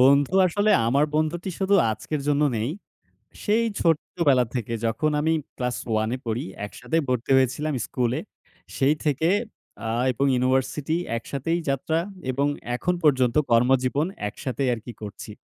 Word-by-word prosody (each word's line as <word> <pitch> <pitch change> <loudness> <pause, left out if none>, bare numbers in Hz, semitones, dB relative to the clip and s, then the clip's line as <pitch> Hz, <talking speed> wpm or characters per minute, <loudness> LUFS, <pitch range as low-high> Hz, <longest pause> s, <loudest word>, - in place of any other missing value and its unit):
বন্ধু 140 +6 +5
আসলে 205 +4 +1 0.2
আমার 140 +5 +3
বন্ধুটি 160 +4 0
শুধু 195 +1 +2 0.2
আজকের 140 +7 -3
জন্য 145 +1 +3
নেই। 115 +6 -1 0.7
সেই 225 +2 +2
ছোট্টবেলা 150 -5 +2
থেকে 115 -1 -2
যখন 115 +7 +1
আমি 160 +1 +2 0.2
class 125 -1 -2
1 110 0 +1
এ - - -5
পড়ি, 115 +1 -2 0.2
একসাথে 160 - -3
পড়তে 125 0 -1
হয়েছিলাম 145 +4 +1
স্কুলে। 125 +3 -1 0.6
সেই 140 +3 +3
থেকে 150 +3 +2 0.6
আ - - -1 0.2
এবং 130 +3 0
university 130 +5 0 0.2
একসাথেই 140 +8 -2
যাত্রা 160 +4 0 0.3
এবং 140 +3 +1 0.3
এখন 180 +8 0
পর্যন্ত 130 -5 +3 0.2
কর্মজীবন 130 +5 +3 0.2
একসাথেই 130 +4 -2
আরকি 115 +1 -7
করছি, 105 0 -8
135 Hz, 135 wpm, -24 LUFS, 125-155 Hz, 0.7 s, বন্ধু